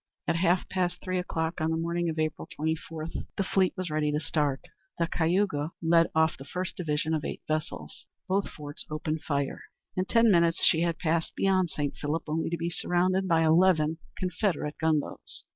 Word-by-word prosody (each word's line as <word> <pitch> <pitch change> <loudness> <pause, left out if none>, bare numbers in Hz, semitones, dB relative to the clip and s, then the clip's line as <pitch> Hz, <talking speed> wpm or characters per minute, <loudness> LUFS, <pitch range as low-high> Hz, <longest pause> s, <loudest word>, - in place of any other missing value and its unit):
At 170 - +2
half 180 +1 +2
past 180 -1 -1
three 185 -1 -1
o'clock 160 -2 -2
on 160 - +1
the 160 - 0
morning 170 +1 -1
of 160 - -4
April 155 -1 -2
24, 160 +1 -3 0.3
the 195 - +2
fleet 190 0 +2
was 185 -3 -3
ready 150 -1 +1
to 150 - 0
start. 145 -4 0 0.4
The 170 - +2
Cayuga 165 -2 0
led 165 0 +4
off 160 0 +3
the - - -9
first 180 +6 -4
division 155 -2 -1
of 155 -2 0
eight - - -5
vessels. 155 - -4 0.2
Both 195 +1 +1
forts 145 -1 -8
opened 155 0 -2
fire. 140 -3 -2 0.3
In 185 - 0
ten 230 +1 +4
minutes 170 -2 +3
she 160 - +5
had 170 -1 +1
passed 165 -1 0
beyond 190 -2 +2
St. 145 -2 -2
Philip 150 +2 -2
only 160 +2 -1
to 170 - -1
be 170 +1 -2
surrounded 185 +2 +1
by 165 -2 +4
eleven 160 -1 +4 0.2
Confederate 180 -4 -1
gunboats. 155 -2 -1
165 Hz, 185 wpm, -28 LUFS, 155-180 Hz, 0.4 s, she